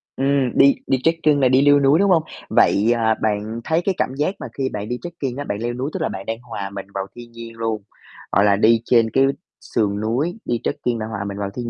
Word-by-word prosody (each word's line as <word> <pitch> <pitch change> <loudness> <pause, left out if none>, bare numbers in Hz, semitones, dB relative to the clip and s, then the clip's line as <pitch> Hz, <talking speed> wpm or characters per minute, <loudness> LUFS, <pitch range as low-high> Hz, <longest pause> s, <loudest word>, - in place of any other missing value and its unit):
Ừm, 135 -2 +1
đi 140 0 +6
đi 130 - +2
trekking 160 -3 +2
là 130 - +4
đi 130 +1 +4
leo 145 0 +5
núi, 140 +3 +4
đúng 200 0 +3
hông? 165 -3 +4 0.3
Vậy, 110 +4 +3
à, 110 -1 +2
bạn 110 +2 -2
thấy 160 +5 +1
cái 195 -2 +1
cảm - - -1
giác 150 +7 -1
mà - - -6
khi 135 -1 -1
bạn 105 +1 -5
đi 125 - -2
trekking 145 -7 -5
á, 145 - -3
bạn 100 - -3
leo 120 +1 -2
núi 130 +4 -3
tức 190 - -4
là - - 0
bạn 95 0 -7
đang 115 0 -4
hòa 100 -5 -6
mình 100 0 -7
vào 95 0 -3
thiên 120 -1 -11
nhiên 115 0 -10
luôn, 110 -2 -2 0.5
hoặc 100 - +3
là 100 -1 +4
đi 110 +2 +4
trên 115 -2 +3
cái 135 +3 +3 0.4
sườn 105 -3 -1
núi, 140 - -1
đi 120 -1 -1
trekking 120 -2 -2
là 110 - -3
hòa 110 -3 -4
mình 100 0 -6
vào 100 -1 -3
thiên 120 -1 -4
120 Hz, 255 wpm, -21 LUFS, 110-140 Hz, 0.5 s, đi